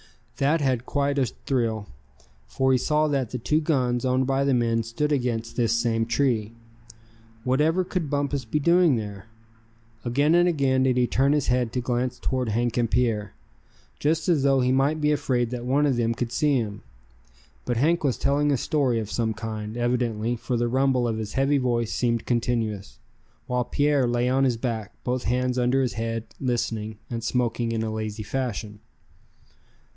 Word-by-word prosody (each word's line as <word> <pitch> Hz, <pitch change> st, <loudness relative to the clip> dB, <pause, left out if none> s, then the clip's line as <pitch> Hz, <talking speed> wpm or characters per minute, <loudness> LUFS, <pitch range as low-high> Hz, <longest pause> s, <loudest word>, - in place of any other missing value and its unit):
Thad 145 Hz, +4 st, +2 dB
had 130 Hz, -3 st, 0 dB
quite 140 Hz, 0 st, 0 dB
a 130 Hz, -, +2 dB
thrill, 115 Hz, -6 st, -2 dB, 0.6 s
for 130 Hz, 0 st, +1 dB
he 130 Hz, -, +4 dB
saw 155 Hz, +3 st, +2 dB
that 135 Hz, -5 st, 0 dB
the 125 Hz, -, -4 dB
two 150 Hz, +6 st, +1 dB
guns 125 Hz, -6 st, 0 dB
owned 130 Hz, 0 st, +1 dB
by 135 Hz, +1 st, +1 dB
the 140 Hz, -2 st, +2 dB
men 115 Hz, -1 st, +1 dB
stood 115 Hz, +7 st, -2 dB
against 120 Hz, -4 st, -1 dB
this 115 Hz, -3 st, +1 dB
same 115 Hz, -1 st, 0 dB
tree. 115 Hz, -4 st, 0 dB, 0.9 s
Whatever 150 Hz, +8 st, +2 dB
could 180 Hz, -4 st, -3 dB
Bumpus 140 Hz, -1 st, -1 dB
be 115 Hz, +6 st, -2 dB
doing 170 Hz, -1 st, +4 dB
there? 105 Hz, -2 st, -6 dB, 0.8 s
Again 140 Hz, +6 st, +2 dB
and 175 Hz, +1 st, +5 dB
again 135 Hz, -5 st, +1 dB
did 130 Hz, -1 st, +2 dB
he 125 Hz, -, +4 dB
turn 135 Hz, +3 st, +2 dB
his 150 Hz, -3 st, +1 dB
head 125 Hz, -2 st, +1 dB
to 125 Hz, -, -1 dB
glance 125 Hz, 0 st, -1 dB
toward 130 Hz, -3 st, -1 dB
Hank 120 Hz, +2 st, 0 dB
and 120 Hz, -2 st, +1 dB
Pierre, 110 Hz, -3 st, 0 dB, 0.6 s
just 160 Hz, +2 st, 0 dB
as 165 Hz, -6 st, +3 dB
though 135 Hz, -1 st, +3 dB
he 125 Hz, 0 st, +2 dB
might 140 Hz, +4 st, +2 dB
be 150 Hz, 0 st, +2 dB
afraid 125 Hz, -5 st, 0 dB
that 120 Hz, -1 st, -4 dB
one 140 Hz, +3 st, +3 dB
of 135 Hz, -4 st, +1 dB
them 115 Hz, -1 st, +1 dB
could 120 Hz, 0 st, -3 dB
see 150 Hz, +1 st, +2 dB
him. 105 Hz, -4 st, -3 dB, 0.8 s
But 120 Hz, -2 st, -2 dB
Hank 160 Hz, +7 st, +2 dB
was 135 Hz, -4 st, +1 dB
telling 145 Hz, +1 st, +1 dB
a 140 Hz, -, +2 dB
story 130 Hz, -2 st, +1 dB
of 110 Hz, -2 st, -3 dB
some 110 Hz, -2 st, -1 dB
kind, 110 Hz, 0 st, -5 dB
evidently, 120 Hz, -2 st, 0 dB
for 120 Hz, +1 st, -2 dB
the 120 Hz, +1 st, +1 dB
rumble 130 Hz, 0 st, +2 dB
of 110 Hz, -1 st, -2 dB
his 105 Hz, -2 st, -5 dB
heavy 140 Hz, +1 st, +2 dB
voice 120 Hz, -3 st, 0 dB
seemed 115 Hz, -2 st, 0 dB
continuous; 115 Hz, -4 st, -1 dB, 0.5 s
while 125 Hz, -1 st, -1 dB
Pierre 145 Hz, -2 st, +2 dB
lay 120 Hz, +1 st, +1 dB
on 135 Hz, +2 st, +2 dB
his 125 Hz, -3 st, +1 dB
back, 115 Hz, -4 st, -4 dB
both 125 Hz, 0 st, -2 dB
hands 125 Hz, +2 st, 0 dB
under 125 Hz, +2 st, +2 dB
his 125 Hz, -, -1 dB
head, 115 Hz, +1 st, -3 dB, 0.2 s
listening, 115 Hz, -4 st, -2 dB
and 115 Hz, -1 st, -3 dB
smoking 120 Hz, -1 st, 0 dB
in 115 Hz, -1 st, -1 dB
a 110 Hz, -1 st, -3 dB
lazy 110 Hz, 0 st, -4 dB
fashion. 110 Hz, -3 st, -4 dB
125 Hz, 185 wpm, -25 LUFS, 115-140 Hz, 0.9 s, and